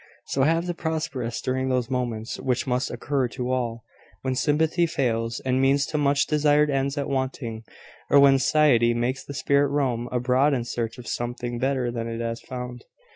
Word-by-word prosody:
So 135 Hz, -, -1 dB
have 165 Hz, +5 st, +2 dB
the 175 Hz, -, -2 dB
prosperous, 160 Hz, -8 st, -3 dB
during 130 Hz, +1 st, -1 dB
those 125 Hz, -1 st, 0 dB
moments 120 Hz, -3 st, -3 dB
which 125 Hz, -2 st, -1 dB
must 125 Hz, 0 st, 0 dB
occur 130 Hz, +2 st, -1 dB
to 125 Hz, +1 st, -4 dB
all, 115 Hz, -3 st, -2 dB, 0.4 s
when 130 Hz, -1 st, 0 dB
sympathy 160 Hz, +5 st, +2 dB
fails, 115 Hz, -6 st, -1 dB
and 130 Hz, 0 st, +1 dB
means 140 Hz, +1 st, +3 dB
to 150 Hz, -, -3 dB
much 140 Hz, 0 st, +3 dB
desired 150 Hz, 0 st, +3 dB
ends 135 Hz, +1 st, -1 dB
are 140 Hz, -, -1 dB
wanting, 130 Hz, -4 st, -3 dB, 0.5 s
or 140 Hz, -, +6 dB
when 135 Hz, -1 st, +6 dB
satiety 130 Hz, -5 st, +4 dB
makes 125 Hz, +3 st, -1 dB
the 140 Hz, -, -8 dB
spirit 140 Hz, +1 st, +2 dB
roam 130 Hz, -4 st, -1 dB
abroad 125 Hz, +3 st, +2 dB
in 120 Hz, -, -1 dB
search 115 Hz, 0 st, -4 dB
of 125 Hz, -, -10 dB
something 120 Hz, 0 st, -3 dB
better 130 Hz, -1 st, 0 dB
than 115 Hz, -1 st, -4 dB
it 115 Hz, 0 st, -4 dB
has 115 Hz, 0 st, -3 dB
found. 125 Hz, -1 st, -7 dB
130 Hz, 180 wpm, -25 LUFS, 120-140 Hz, 0.5 s, or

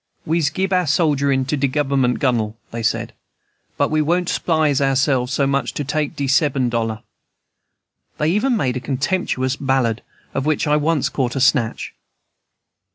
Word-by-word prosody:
"We'se 160 Hz, -2 st, +1 dB
gib 190 Hz, +5 st, -2 dB
our 180 Hz, -2 st, +2 dB
sogerin' 140 Hz, -3 st, +2 dB
to 145 Hz, -, -1 dB
de 140 Hz, -1 st, +1 dB
Guv'ment, 135 Hz, -2 st, +1 dB
Gunnel," 115 Hz, -5 st, 0 dB
they 115 Hz, -, -4 dB
said, 110 Hz, -, -1 dB, 0.6 s
"but -, -, +1 dB
we 155 Hz, 0 st, +2 dB
won't 175 Hz, +3 st, 0 dB
'spise 155 Hz, -4 st, +1 dB
ourselves 135 Hz, -2 st, +1 dB
so 140 Hz, -1 st, +1 dB
much 140 Hz, 0 st, -1 dB
for 145 Hz, -, -1 dB
take 150 Hz, +1 st, -2 dB
de 140 Hz, -, -2 dB
seben 135 Hz, -2 st, +2 dB
dollar." 115 Hz, -2 st, -2 dB, 1.1 s
They 150 Hz, -, +1 dB
even 230 Hz, +6 st, +1 dB
made 130 Hz, -10 st, 0 dB
a -, -, -2 dB
contemptuous 135 Hz, -1 st, -1 dB
ballad, 130 Hz, -4 st, 0 dB, 0.3 s
of 135 Hz, +2 st, -2 dB
which 155 Hz, 0 st, +1 dB
I 150 Hz, 0 st, +2 dB
once 150 Hz, -1 st, +1 dB
caught 125 Hz, -2 st, -2 dB
a -, -, -1 dB
snatch. 130 Hz, -3 st, +1 dB
140 Hz, 160 wpm, -20 LUFS, 130-155 Hz, 1.1 s, our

